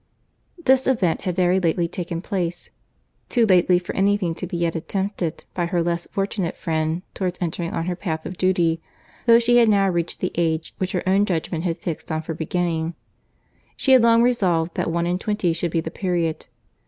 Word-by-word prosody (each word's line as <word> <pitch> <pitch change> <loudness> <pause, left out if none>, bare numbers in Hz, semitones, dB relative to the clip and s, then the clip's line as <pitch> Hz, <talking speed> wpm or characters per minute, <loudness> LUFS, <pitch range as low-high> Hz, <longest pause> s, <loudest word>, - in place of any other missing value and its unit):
This 265 -6 +3
event 200 -11 +1
had 180 -2 -1
very 180 0 +3
lately 170 -1 +1
taken 170 0 -5
place; 175 -5 -3 0.6
too 235 -2 +3
lately 180 -2 +4
for 180 - -5
any 200 +1 +3
thing 175 -5 -1
to 180 +2 -6
be 175 -1 -4
yet 170 -1 0
attempted 190 0 -3
by 175 -2 -1
her 170 -1 0
less 170 0 -2
fortunate 195 -3 -2
friend 160 +1 -1
towards 180 -2 -2
entering 170 -1 -2
on 165 - -2
her 180 0 -2
path 160 -4 -4
of 185 - -5
duty; 170 -3 +1 0.5
though 230 0 +8
she 240 +1 +4
had 235 -2 +5
now 200 -2 +4
reached 170 -2 -2
the 185 - -1
age 160 -1 -1
which 185 -1 -2
her 180 - -2
own 195 +2 +3
judgment 165 -1 -2
had 170 -1 -1
fixed 165 -2 -5
on 155 0 -2
for 165 - -4
beginning. 165 0 -2 0.8
She 270 - +1
had 260 -2 +8
long 230 0 +5
resolved 180 -9 +1
that - - -1
one 170 +1 0
and 180 +1 -1
twenty 210 -5 0
should 170 +1 -1
be 165 0 0
the 160 - -6
period. 175 -4 -2
175 Hz, 200 wpm, -22 LUFS, 165-195 Hz, 0.8 s, though